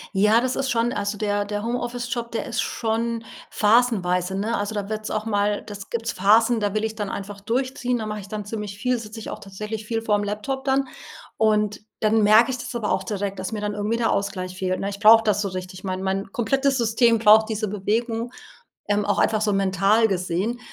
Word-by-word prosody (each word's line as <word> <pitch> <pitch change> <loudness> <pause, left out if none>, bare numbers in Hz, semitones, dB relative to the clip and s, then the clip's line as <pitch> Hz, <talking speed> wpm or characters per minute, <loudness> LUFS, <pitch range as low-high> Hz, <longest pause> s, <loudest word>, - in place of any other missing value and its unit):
Ja, 210 +4 +4
das 255 +1 -1
ist 270 -1 -1
schon 235 0 +1
also, 205 -2 -2
der 205 -1 0
der 205 0 -4
Homeoffice-Job, 240 0 -3
der 225 - -2
ist 235 -2 -1
schon 230 0 -2 0.3
phasenweise, 195 -5 +2
ne? 215 +4 -1
Also, 205 +1 -3
da 205 -1 -3
wird's 215 0 -4
auch 215 0 -2
mal 205 -1 0
das 205 -2 -9
gibt's 230 -1 -2
Phasen 220 +5 +4
da 205 -1 -1
will 215 0 0
ich 220 0 -2
dann 205 -3 -3
einfach 200 0 -6
durchziehen, 250 +3 -1
dann 215 -1 -4
mache 210 0 -4
ich 200 - -10
dann 210 +1 -5
ziemlich 210 -1 -6
viel, 250 +3 0
sitze 220 0 -8
ich - - -7
auch - - -6
tatsächlich 210 +2 -6
viel 225 -1 -1
vorm 210 -2 +1
Laptop 215 +7 -3
dann. 270 0 +1 0.5
Und 210 -1 +2 0.2
dann 215 0 +3
merke 220 +4 +6
ich 255 - -3
das 250 0 -7
aber 220 -3 -1
auch - - 0
direkt, 200 -1 -3
dass 190 +4 -4
mir 210 - -3
dann 210 0 -2
irgendwie 210 +2 -1
der 230 -1 +1
Ausgleich 185 -2 -2
fehlt, 185 -1 -1
ne? 200 - -1
Ich 200 0 -7
brauche 225 +1 +7
das 210 -2 +1
so 200 - -1
richtig, 185 0 -7
mein 185 0 -3
mein 195 +1 -2
komplettes 270 +4 +1
System 235 0 +3
braucht 220 0 +6
diese 215 -2 -2
Bewegung, 225 +4 -2 0.6
ähm, 205 0 +2
auch 205 - +1
einfach 215 - +2
so 210 -1 +1
mental 195 +3 +3
gesehen. 185 +6 -1
215 Hz, 215 wpm, -23 LUFS, 200-230 Hz, 0.6 s, brauche